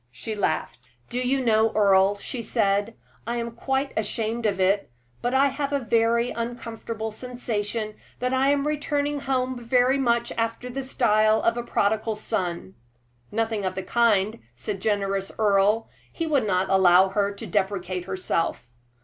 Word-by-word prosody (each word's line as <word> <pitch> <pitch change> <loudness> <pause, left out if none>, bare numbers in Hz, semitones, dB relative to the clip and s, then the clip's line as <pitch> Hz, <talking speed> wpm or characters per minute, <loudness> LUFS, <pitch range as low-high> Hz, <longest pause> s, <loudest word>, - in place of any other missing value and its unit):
She 125 - -6
laughed. 155 - -2 0.2
"Do 245 - -1
you 255 +1 0
know, 220 -1 +3
Earle," 195 -1 +4
she 235 +4 -5
said, 210 -1 0 0.3
"I 235 - -1
am 235 0 -3
quite 270 +4 -2
ashamed 225 +1 -1
of 195 -2 -1
it, 195 -1 +2 0.3
but 245 +2 0
I 275 +1 +5
have 280 +1 -3
a 285 - +2
very 235 0 +2
uncomfortable 230 -1 -5
sensation 220 -2 -3 0.2
that 250 +1 -1
I 265 +1 +3
am 285 0 +2
returning 290 -1 -1
home 255 -2 -1
very 255 +3 +3
much 235 -2 +1
after 230 +2 -2
the 270 +2 -3
style 215 -4 +3
of 230 - +3
the 240 - -3
prodigal 220 -1 0
son." 180 - -3 0.6
"Nothing 225 -1 -1
of 185 - -2
the 190 - -3
kind," 215 -1 +2 0.2
said 195 - -5
generous 195 -2 -1
Earle. 210 +1 +3 0.2
He 330 - -3
would 280 -8 +1
not 185 -1 +1
allow 190 0 +6
her 200 +1 0
to 225 - -8
depreciate 190 -2 -1
herself. 180 -9 -2
225 Hz, 160 wpm, -25 LUFS, 200-245 Hz, 0.6 s, allow